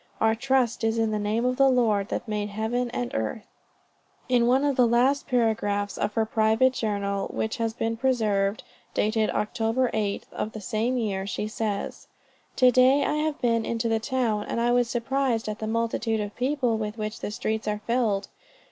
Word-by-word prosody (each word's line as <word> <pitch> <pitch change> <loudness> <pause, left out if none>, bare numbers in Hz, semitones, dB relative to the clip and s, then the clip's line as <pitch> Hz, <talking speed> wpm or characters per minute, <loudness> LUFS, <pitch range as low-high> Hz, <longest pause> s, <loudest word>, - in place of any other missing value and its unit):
"our 220 0 +3
trust 245 -1 +1
is 225 0 +1
in 225 -1 +1
the 215 - -1
name 215 +3 0
of 250 0 0
the 275 0 +5
Lord 220 -6 +2
that - - -3
made 210 -1 -2
heaven 225 +4 -1
and 120 - -4
earth." 110 - -3 0.8
In 245 -2 +3
one 260 +3 +3
of 285 -2 +1
the 250 -2 +4
last 255 +4 +2
paragraphs 205 -4 0
of 205 0 -2
her 225 - +2
private 220 +4 +3
journal 200 -4 -2
which 220 +3 -3
has 230 -1 0
been 225 0 -1
preserved, 215 -5 +1 0.3
dated 215 +1 +1
Oct. 215 +4 -2
8th 225 -3 0
of 215 - -4
the 220 - -6
same 220 +5 -1
year, 195 -4 -2
she 210 - -3
says: 215 -2 -4 0.5
"To 255 -1 +5
day 255 +3 +5
I - - 0
have 305 -1 -1
been 230 -2 +2
into 230 +1 -1
the 225 -1 +1
town, 225 -3 -1
and - - -2
I 240 +1 +2
was 245 -1 +2
surprised 240 -1 0
at 215 0 -4
the 220 - -3
multitude 225 0 -1
of 205 0 -4
people 255 -3 0
with 215 +1 -4
which 215 0 -4
the - - -4
streets 220 0 -3
are 210 0 -1
filled. 230 -5 0
225 Hz, 190 wpm, -26 LUFS, 215-245 Hz, 0.8 s, the